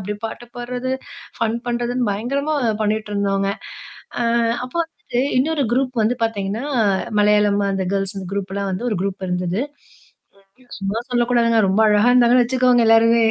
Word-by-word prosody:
அப்படியே 205 +2 -5
பாட்டு 240 +2 -9
பாட்றது, 250 +1 -3 0.5
ஃபன் 230 0 0
பண்ணுறதுன்னு 240 0 -1
பயங்கரமா 280 +8 -2 0.3
பண்ணிட்டிருந்தோங்க. 205 -2 0 0.7
ஆ, - - +1 0.4
அப்போ 255 - -8
வந்துட்டு 325 -7 -4 0.2
இன்னொரு 295 +2 +1
குரூப் 255 0 0
வந்து 220 +3 +2
பார்த்திங்கன்னா 215 +1 -3 0.6
மலையாளம். 210 -1 +3
அந்த 195 -1 -1
கேர்ல்ஸ். 195 -1 -1
அந்த 190 - -6
குரூப்லாம் 200 0 -3
வந்து 190 +7 -3
ஒரு 210 - -1
குரூப் 195 -1 -3
இருந்தது. 180 +2 -1 1.0
ஐயோ! 255 - -23
சும்மா 200 +3 -2
சொல்லக்கூடாதுங்க. 240 -1 +2
ரொம்ப 195 +3 +2
அழகாக 210 +3 +4
இருந்தாங்கன்னு 245 0 +5
வச்சுக்கோங்களேன் 250 -1 +3
எல்லாருமே. 230 +1 +5
225 Hz, 140 wpm, -20 LUFS, 200-245 Hz, 1.0 s, இருந்தாங்கன்னு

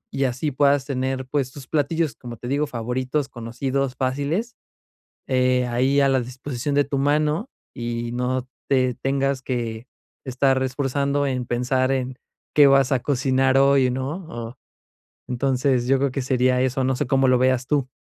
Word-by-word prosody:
Y 135 - +1
así 130 +4 -1
puedas 140 0 +2
tener, 130 -1 -2
pues, 130 0 -1
tus 135 -2 -11
platillos, 155 0 0
como 120 -2 -9
te 120 - -8
digo, 145 +3 0
favoritos, 130 +3 -2
conocidos, 130 +3 -3
fáciles, 145 - -2 0.7
eh, 125 -1 +2
ahí 130 +4 +2
a 140 - +4
la 135 - +3
disposición 130 +2 -4
de 145 - +4
tu 140 0 -3
mano 150 - +1 0.2
y 120 -1 -4
no 125 +1 -1 0.2
te 130 -2 +2
tengas 135 +1 -1
que 120 -2 -4 0.4
estar 130 0 +1
esforzando 140 +2 0
en 130 -2 -2
pensar 130 +2 0
en 130 -1 -3 0.4
qué 145 -1 +7
vas 135 0 +4
a 130 - +3
cocinar 130 0 +1
hoy, 135 -1 +4
¿no?, 135 +8 -4
o, 120 +1 -7 0.7
entonces, 125 0 +1
yo 135 0 +4
creo 140 -1 0
que 135 - -2
sería 125 0 +2
eso, 130 0 0
no 130 - +1
sé 125 - -2
cómo 135 0 +3
lo 130 -1 +4
veas 130 0 +2
tú. 140 -3 0
130 Hz, 165 wpm, -23 LUFS, 125-140 Hz, 0.7 s, qué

